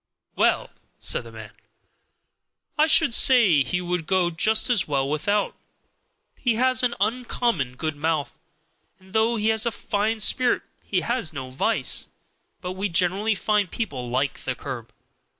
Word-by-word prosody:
"Well," - - +1 0.3
said - - 0
the - - -11
man, - - -10 1.2
"I 310 0 +3
should 320 -5 +4
say 225 - +5
he 180 +8 -2
would 175 -2 -3
go 185 -2 +2
just 215 +6 +2
as 230 -7 +3
well 135 -2 0
without; 200 +8 -1 0.8
he 240 -3 0
has 255 +2 +2
an 245 -1 0
uncommon 220 - -1
good 155 +3 -3
mouth, 155 0 -2 0.6
and 190 0 -20
though 225 +2 +2
he 215 0 0
has 220 +1 +3
a - - 0
fine 220 0 -2
spirit 245 +3 +2 0.2
he 185 -3 -1
has 230 -8 -1
no 130 -3 -7
vice; 130 - 0 0.5
but 180 - -4
we 195 +2 -3
generally 190 +5 +1
find 210 -1 0
people 135 - -4
like 130 +3 -1
the 130 - -4
curb." 120 -5 -7
195 Hz, 150 wpm, -24 LUFS, 155-225 Hz, 1.2 s, say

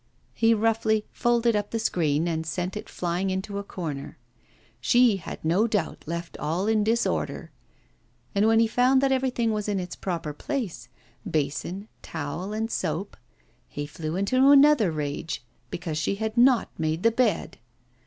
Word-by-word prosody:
He 230 0 +3
roughly 220 -1 +1
folded 235 -1 +2
up 205 0 -1
the 230 - -2
screen 165 -7 +1
and 160 -1 -1
sent 175 +4 -3
it 210 - -6
flying 180 +2 -2
into 190 +2 -3
a - - -5
corner. 155 -8 -6 0.6
She 235 - +4
had 165 - -8
no 185 +8 +3
doubt 210 -3 -2
left 170 +1 -5
all 165 +6 -1
in 215 -1 +2
disorder. 230 +2 -1 0.8
And 205 +1 +3
when 225 0 +5
he 230 - +5
found 250 +4 +3
that 275 -1 +2
everything 255 -3 +1
was 210 -1 -2
in 200 -2 0
its 180 -1 -5
proper 165 -5 -3
place 240 - -4 0.4
basin, 155 +7 -2
towel, 165 +5 -5
and 220 +1 -2
soap 180 +4 -2 0.5
he 145 - -5
flew 155 +2 -5
into 200 +7 0
a 285 +2 +8
rage 150 -2 -4 0.2
because 165 -3 -4
she 175 - 0
had 220 +2 -3
not 245 0 +4
made 160 +1 -1
the 230 - +5
bed. 230 -2 0
200 Hz, 160 wpm, -26 LUFS, 165-225 Hz, 0.8 s, a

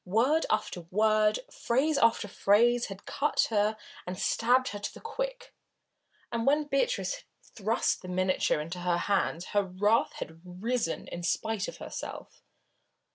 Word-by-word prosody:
Word 245 - +2
after 215 -4 -1
word, 215 - +3
phrase 280 +5 +1
after 225 -2 +3
phrase 235 +5 +3
had 195 0 -9
cut 295 +2 +1
her 210 0 +2 0.3
and 180 0 -4
stabbed 250 +6 +2
her 205 - -6
to - - -4
the - - -12
quick, - - -5 0.8
and 230 +1 -1
when 295 +2 +4
Beatrice 290 - 0
had - - -17 0.2
thrust 220 +2 -1
the 185 - -9
miniature 185 -3 +1
into 165 +4 -5
her 175 -1 +1
hands 185 -2 0
her 205 - +4
wrath 200 +4 +1
had 160 +1 -8
risen 185 +2 -2
in 175 - -6
spite 200 +4 -1
of - - -7
herself. - - -8
215 Hz, 150 wpm, -29 LUFS, 185-250 Hz, 0.8 s, when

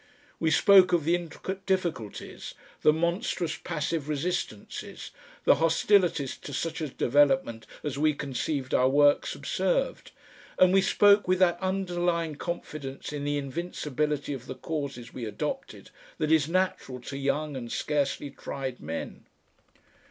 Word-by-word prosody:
We 160 - +2
spoke 185 +3 +6
of 170 -3 +3
the 165 +3 +2
intricate 175 +2 -4
difficulties, 170 - -3 0.3
the 150 - +6
monstrous 170 +1 -1
passive 155 -2 -2
resistances, 150 - -4 0.3
the - - +6
hostilities 165 -3 +3
to 145 - -9
such 165 +4 -3
a 155 - -1
development 135 -4 +2 0.2
as 145 -2 -3
we 155 0 +3
conceived 140 -1 -3
our 130 +1 +4
work 145 +1 +4
subserved, - - -1 0.5
and 185 0 +5
we 195 - +6
spoke 205 +1 +5
with 185 0 +3
that 175 -2 +3
underlying 175 -4 0
confidence 150 -4 -6
in 145 -1 -4
the 145 0 0
invincibility 150 -1 -2
of 130 -2 -8
the - - -5
causes 140 -7 -5
we 120 - -5
adopted 105 -1 -5 0.3
that 155 0 0
is 160 -1 +4
natural 185 -8 -1
to 135 - -7
young 145 +2 -1
and 120 -3 -6
scarcely 145 -1 -1
tried 130 -2 -5
men. 80 +2 -6
155 Hz, 135 wpm, -28 LUFS, 140-175 Hz, 0.5 s, spoke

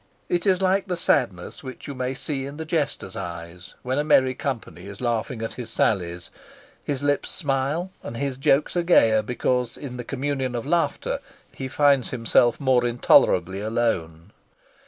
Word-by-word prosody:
It 175 +3 0
is 190 0 +3
like 190 +1 +2
the 180 -2 -2
sadness 110 - 0
which 130 +2 -9
you 140 - -5
may 130 0 -3
see 135 0 -3
in 140 +1 -8
the 160 - -5
jester's 150 - -2
eyes 85 +1 -8
when 130 +3 0
a - - +2
merry 130 -4 +4
company 130 -8 -5
is 100 0 -9
laughing 115 -1 -2
at 115 - -3
his 120 -3 -7
sallies; 90 -6 -1 0.5
his 140 -1 -3
lips 145 0 +1
smile 145 +4 -1
and 115 - -7
his 135 -1 -2
jokes 135 +4 +2
are 175 - +2
gayer 115 -11 +5
because 125 +2 -1
in 130 -4 -7
the 120 - -5
communion 135 -1 -2
of 120 - -3
laughter 170 +3 0 0.3
he 135 - -5
finds 140 -1 +3
himself 120 -1 +3
more 130 -3 +3
intolerably 95 -6 +3
alone. 105 -6 -2
130 Hz, 170 wpm, -24 LUFS, 115-145 Hz, 0.5 s, gayer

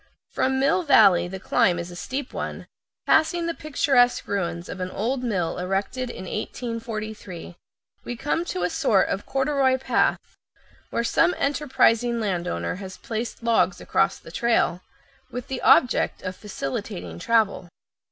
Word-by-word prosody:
From 265 0 +1
Mill 275 +7 +3
Valley 180 - +5
the 190 +2 -6
climb 180 -1 +2
is 170 +1 -5
a - - -9
steep 260 +8 -5
one, - - -5 0.4
passing 335 +2 +3
the 335 - -1
picturesque 275 -6 +2
ruins 175 -3 -2
of 190 - -7
an 185 0 -3
old 245 +7 -2
mill 185 -8 -1
erected 195 +7 -2
in 190 - -7
1843. 215 -5 -5 0.5
We 245 - -5
come 295 +7 -1
to 185 - -3
a 180 - +1
sort 195 -3 +2
of 195 - -3
corduroy 270 -1 +2
path, 260 - +2 0.7
where 235 - -1
some 330 +9 +3
enterprising 250 -5 +2
landowner 175 - -2
has 190 -1 -8
placed 230 +1 -5
logs 230 -1 +2
across - - +1
the - - -13
trail, 225 -7 +1 0.5
with 250 +2 -6
the 265 -1 -3
object 250 - +4
of 185 0 -4
facilitating 90 - -5
travel. 210 - +1
225 Hz, 145 wpm, -24 LUFS, 185-260 Hz, 0.7 s, Valley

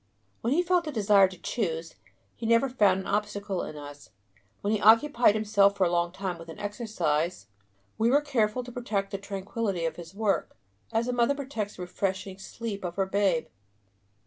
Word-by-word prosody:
When 235 - -1
he 350 +4 +3
felt 355 -2 +2
a - - -2
desire 205 -5 +5
to 185 0 -11
choose, 165 -6 -3 0.4
he 230 - -4
never 230 +3 +4
found 205 -7 +3
an - - -10
obstacle 205 -2 -2
in 150 - -6
us; 145 -6 -10 0.5
when 205 +2 0
he 210 - 0
occupied 230 +1 +5
himself 205 -2 +3
for 195 - +3
a 175 - +2
long 175 0 +1
time 185 -2 -4
with 165 0 -11
an 160 - -9
exercise, 180 -6 -2 0.5
we 225 +1 +3
were 280 +3 +5
careful 250 -4 0
to 245 - -9
protect 210 -5 -2
the 195 - -3
tranquillity 195 -2 -3
of 165 - -2
his 170 +2 -10
work, 210 -2 -1 0.3
as 230 +1 0
a 250 - 0
mother 245 +3 +2
protects 255 -7 -4
the 180 - -6
refreshing 190 +1 -3
sleep 205 0 -6
of 175 -1 -4
her 195 - +1
babe. 190 -4 +1
205 Hz, 190 wpm, -28 LUFS, 185-230 Hz, 0.5 s, desire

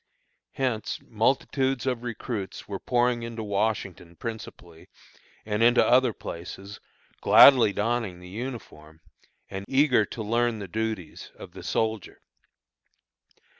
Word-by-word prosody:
Hence 125 -6 -2
multitudes 130 +3 0
of 125 -3 -1
recruits 115 -4 -5
were 100 -2 -5
pouring 120 -1 +1
into 115 -1 -6
Washington 100 -4 -2
principally, 90 -6 -9 0.6
and 105 0 -2
into 120 +1 +5
other 125 -1 +4
places, 95 +2 -8 0.4
gladly 125 -6 +8
donning 105 -3 -2
the 90 - -12
uniform, 90 -8 -8 0.5
and 95 0 -6
eager 135 -4 +3
to 110 - -6
learn 120 +1 0
the 100 -2 -7
duties, 110 -3 -5
of - - -11
the - - -11
soldier. 110 -3 -2
110 Hz, 115 wpm, -26 LUFS, 100-120 Hz, 0.6 s, gladly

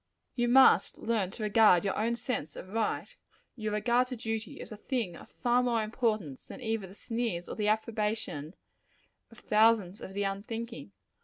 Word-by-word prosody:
You 240 -1 0
must 265 +2 +6
learn 220 -5 0
to 215 +2 -7
regard 210 -4 +5
your 195 - 0
own 230 +2 0
sense 235 - -3
of 185 - -9
right 220 +1 -2 0.4
your 215 -3 -3
regard 240 +4 +2
to 250 - -5
duty 225 -1 -4
as - - -8
a 215 - -7
thing 220 -6 -2
of - - -13
far 245 0 +1
more 235 -3 +1
importance 215 - -1
than - - -10
either 225 -5 -2
the 190 - -14
sneers 225 -7 -3
or - - -5
the 210 -1 -1
approbation 215 -7 -1 0.7
of 230 - -17
thousands 215 -3 +3
of 190 - -8
the 200 - 0
unthinking. 200 - -5
220 Hz, 175 wpm, -30 LUFS, 200-235 Hz, 0.7 s, must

